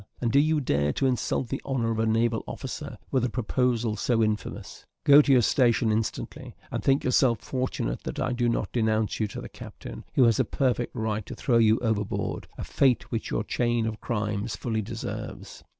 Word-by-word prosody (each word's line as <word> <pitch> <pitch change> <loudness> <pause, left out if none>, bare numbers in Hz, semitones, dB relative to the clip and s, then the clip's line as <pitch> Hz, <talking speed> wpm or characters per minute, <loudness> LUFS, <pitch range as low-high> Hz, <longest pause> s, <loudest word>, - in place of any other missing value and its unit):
and 120 -2 0
do 140 - +5
you 155 +1 +3
dare 75 - +1
to 135 - -1
insult 125 0 0
the 135 - -3
honour 120 -4 -1
of 110 - -2
a 110 - +2
naval 115 0 +1
officer - - -6
with 130 -3 +2
a 125 - +1
proposal 120 -1 0
so 115 +2 +1
infamous? 110 -1 -3 0.2
Go 145 +1 +8
to 145 - +1
your 125 -3 +6
station 120 -2 +3
instantly, 110 +1 -3 0.2
and - - -3
think 135 +1 +3
yourself 125 -3 +3
fortunate 130 - -3
that - - -5
I 125 - 0
do 120 -1 +1
not 110 -3 -1
denounce 110 -2 0
you 110 - +1
to 100 - -7
the - - -7
captain, - - -10
who 130 - +5
has 115 -3 +4
a - - +5
perfect 125 -3 -1
right 110 -1 -2
to - - -7
throw 120 -3 +2
you 110 0 +5
overboard 110 -3 -2
a - - -5
fate 125 -5 +1
which 115 - -3
your - - -1
chain 120 0 0
of 110 -1 -4
crimes 105 -1 -2
fully 110 0 -2
deserves." 100 - -7
115 Hz, 200 wpm, -27 LUFS, 110-125 Hz, 0.2 s, Go